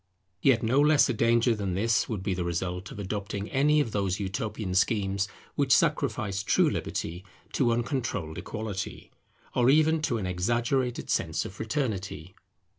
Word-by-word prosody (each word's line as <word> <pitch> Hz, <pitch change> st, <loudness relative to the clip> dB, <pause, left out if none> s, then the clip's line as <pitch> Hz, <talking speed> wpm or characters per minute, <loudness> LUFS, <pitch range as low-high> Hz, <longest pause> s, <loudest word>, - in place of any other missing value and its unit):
Yet 120 Hz, -4 st, +4 dB
no 125 Hz, +5 st, +3 dB
less 150 Hz, 0 st, +5 dB
a -, -, +1 dB
danger 115 Hz, +1 st, +3 dB
than 100 Hz, -4 st, -2 dB
this 110 Hz, +2 st, +1 dB
would 105 Hz, -5 st, -3 dB
be 95 Hz, -1 st, 0 dB
the 90 Hz, -1 st, -2 dB
result 90 Hz, +2 st, -3 dB
of -, -, -9 dB
adopting 100 Hz, +1 st, -4 dB
any 150 Hz, +2 st, +3 dB
of 120 Hz, -7 st, 0 dB
those 100 Hz, -2 st, -1 dB
utopian 105 Hz, -1 st, -3 dB
schemes 100 Hz, 0 st, +1 dB, 0.3 s
which -, -, 0 dB
sacrifice 100 Hz, -2 st, +2 dB
true -, -, +3 dB
liberty 85 Hz, +3 st, -3 dB, 0.3 s
to 125 Hz, -4 st, +2 dB
uncontrolled 120 Hz, -, -2 dB
equality, 105 Hz, -3 st, -5 dB, 0.4 s
or 125 Hz, 0 st, +3 dB
even 155 Hz, +2 st, +4 dB
to 120 Hz, -6 st, 0 dB
an 100 Hz, -, -3 dB
exaggerated 120 Hz, +7 st, 0 dB
sense -, -, 0 dB
of -, -, -7 dB
fraternity. 100 Hz, -, -3 dB
110 Hz, 155 wpm, -28 LUFS, 95-120 Hz, 0.4 s, less